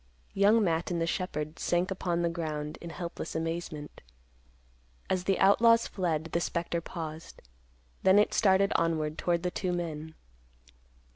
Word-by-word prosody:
Young 210 +3 +4
Matt 165 -2 0
and 175 -2 -1
the 165 - +1
shepherd 155 -3 -3
sank 175 +2 0
upon 175 -2 -1
the 170 - +2
ground 155 -3 -4
in 170 - -7
helpless 170 -1 -6
amazement. 160 -2 -4 1.1
As 185 -1 0
the 195 -1 +2
outlaws 230 +4 +5
fled, 165 -4 -2
the 170 - 0
spectre 170 0 -2
paused. 160 -2 -7 0.6
Then 190 +1 +5
it 210 - +4
started 195 -1 +3
onward 160 -2 0
toward 170 -1 0
the 180 - -1
two 185 0 -2
men. 160 -2 -4
170 Hz, 145 wpm, -29 LUFS, 160-185 Hz, 1.1 s, outlaws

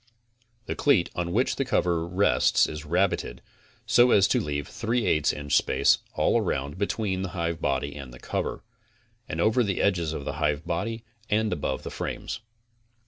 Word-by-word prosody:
The - - -3
cleat 120 -12 +2
on 85 0 -2
which 120 +8 +1
the 135 - +1
cover 90 -9 0
rests 95 +3 +3
is 75 +1 -6
rabited 85 -6 0 0.5
so 120 +1 +5
as 100 -5 +5
to - - +3
leave 75 -1 -3
a - - -14
3 115 0 -1
8 75 -5 +2
inch 70 -1 -2
space - - +3 0.2
all - - +2
raound 70 +5 -3
between 100 -2 -1
the 95 0 -4
hivebody 70 -5 -1
and 65 -4 -9
cover, - - -3 0.7
and 80 - -4
over 110 +7 +3
the 100 -3 -1
edges 85 -5 +1
of 75 -3 -5
the - - -4
hivebody 85 +10 -1 0.3
and 110 -1 +1
above 70 -5 -3
the - - -6
frames. - - -4
85 Hz, 165 wpm, -26 LUFS, 75-105 Hz, 0.7 s, so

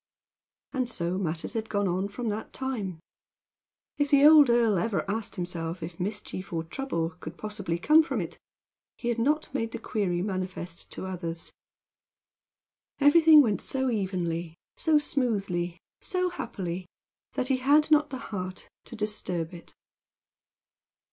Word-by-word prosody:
And 255 -3 0
so 180 -4 -1
matters 165 0 -2
had 225 -1 -3
gone 205 -1 +1
on 185 +2 0
from 225 +3 -4
that 215 +1 -4
time. 215 -10 -3 1.0
If 290 -1 +2
the 280 0 +6
old 300 -3 +9
earl 235 -4 +4
had 170 - +1
ever 220 -3 -1
asked 210 +1 -3
himself 175 -2 -4
if 165 +1 -7
mischief, 195 0 -4
or 165 -1 -1
trouble, 165 -3 -2
could 160 - -8
possibly 205 -5 -3
come 305 - +6
from 320 - -2
it, - - -5 0.6
he 240 - -3
had 235 -1 0
not 300 +4 +1
made 230 -4 -2
the - - -2
query 190 -6 -1
manifest 185 -3 -4
to - - -6
others. 170 -3 -4 1.5
Everything 305 +1 +8
went 215 -5 0
so 265 -1 0
evenly, 175 -5 -2 0.2
so 315 -2 +3
smoothly, 200 - 0
and - - -26 0.2
so 365 -2 0
happily, 185 - -5 0.5
that 255 - -2
he 265 - +3
had 290 +4 +4
not 300 -1 +5
the 265 - -4 0.2
heart 185 -1 -5 0.2
to 235 - -9
disturb 185 -6 -3
it. 170 - -12
205 Hz, 150 wpm, -28 LUFS, 175-265 Hz, 1.5 s, old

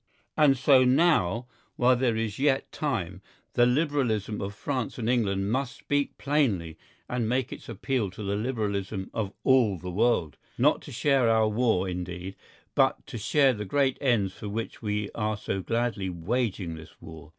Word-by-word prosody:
And 145 -3 +5
so 130 0 +5
now, 125 - +3 0.3
while 125 +1 +4
there 120 -2 +1
is 110 -1 -3
yet 135 -1 +1
time, 95 - -3 0.3
the 120 0 +4
Liberalism 125 -7 0
of 100 +1 -5
France 130 0 -3
and 115 -3 -3
England 100 -5 +1
must 135 +3 -2
speak 145 0 -1
plainly 115 - 0 0.3
and 120 -3 -1
make 125 +1 0
its - - -11
appeal 115 -1 -1
to 100 +3 -9
the 100 0 -1
Liberalism 105 -4 -2
of 105 -4 -2
all 125 -7 +4
the 90 +1 -6
world, 95 -5 +1 0.2
not - - +3
to - - -11
share 135 -5 +2
our 110 -1 +4
war 110 -4 +1
indeed, 90 +1 -5 0.4
but - - +2
to 120 - -7
share 135 +5 +3
the 105 -2 -5
great 135 +5 +1
ends 115 -9 +2
for 105 - -7
which 110 +2 -5
we 105 -1 -2
are 105 -1 -1
so 95 -2 -3
gladly 115 -3 -1
waging 95 0 -2
this 80 0 -12
war. 80 -2 -11
110 Hz, 170 wpm, -27 LUFS, 95-130 Hz, 0.4 s, And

